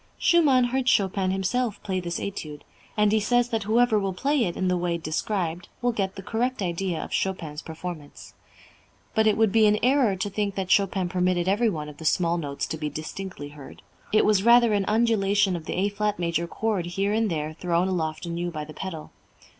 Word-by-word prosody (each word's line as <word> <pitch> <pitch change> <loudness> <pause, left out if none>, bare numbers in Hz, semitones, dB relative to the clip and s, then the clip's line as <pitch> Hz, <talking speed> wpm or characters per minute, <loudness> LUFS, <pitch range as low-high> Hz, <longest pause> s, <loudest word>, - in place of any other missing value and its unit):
Schumann 295 -7 +4
heard 255 +1 +1
Chopin 195 -3 +2
himself 205 +4 -1
play 190 -2 -1
this 175 -1 -4
Étude, 155 -7 -6 0.4
and 210 -1 +4
he 220 - +3
says 245 +3 +2
that 225 -2 -1
whoever 225 0 +3
will 195 -2 -2
play 280 +4 +1
it 175 - -4
in 185 - 0
the 180 - +2
way 175 -1 -1
described 170 +1 -3
will 245 0 +1
get 195 -4 -2
the 195 - -8
correct 235 +2 -1
idea 175 -1 -2
of - - -9
Chopin's 165 -5 -2
performance. 160 -2 -8 0.8
"But 220 0 +3
it 215 - +3
would 220 -2 +3
be 220 0 +5
an 210 0 +3
error 255 -5 +3
to 190 +2 -2
think 200 0 -2
that 190 -1 -3
Chopin 195 -2 +2
permitted 180 0 0
every 215 +4 +3
one 155 -6 -4
of 150 -1 -10
the 160 - -9
small 170 +1 +2
notes 140 -3 -3
to 160 - -5
be 150 -1 -2
distinctly 155 +1 -7
heard. 145 -2 -13 0.3
It 215 - +4
was 210 -3 +3
rather 235 0 +5
an 200 -1 +1
undulation 205 -4 +2
of 165 -2 -6
the - - -3
A 195 +2 +1
flat 210 0 -1
major 170 -1 -1
chord 200 -2 -2
here 195 +4 -1
and 220 0 +1
there 155 -2 -3
thrown 175 +2 0
aloft 165 -3 -2
anew 170 +1 -3
by 155 -3 -5
the 155 - -11
pedal. 165 -4 -7
190 Hz, 210 wpm, -25 LUFS, 170-215 Hz, 0.8 s, be